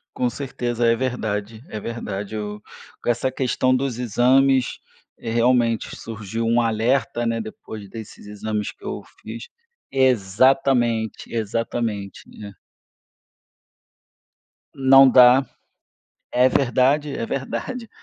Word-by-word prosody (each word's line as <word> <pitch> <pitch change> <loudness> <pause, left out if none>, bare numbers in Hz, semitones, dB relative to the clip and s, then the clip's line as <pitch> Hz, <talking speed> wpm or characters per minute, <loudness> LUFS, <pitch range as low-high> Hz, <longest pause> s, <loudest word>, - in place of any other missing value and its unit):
Com 125 - 0
certeza, 120 -3 -3
é 115 - +4
verdade, 110 -3 -3
é 110 - -5
verdade. 105 -2 -5
Eu 105 0 -5 0.4
com - - -3
essa 120 +2 0
questão 130 0 +1
dos 130 -2 -2
exames, 130 +2 +2 0.4
eh, 115 - -6
realmente 120 -1 +1
surgiu 110 0 -5
um 115 +1 +3
alerta, 115 +2 0
né, 115 0 0
depois 110 -1 -8
desses 110 -1 -10
exames 105 0 -4
que - - -24
eu - - -5 0.2
fiz, - - -8 0.4
exatamente, 125 -1 +2
exatamente, 110 -2 -3 0.2
é. 100 - -8 2.2
Não 135 0 +6
dá, 125 +1 +7 0.9
é 125 +1 +4
verdade, 135 +3 +2
é - - -3
verdade. 230 - -4
120 Hz, 110 wpm, -22 LUFS, 110-130 Hz, 2.2 s, dá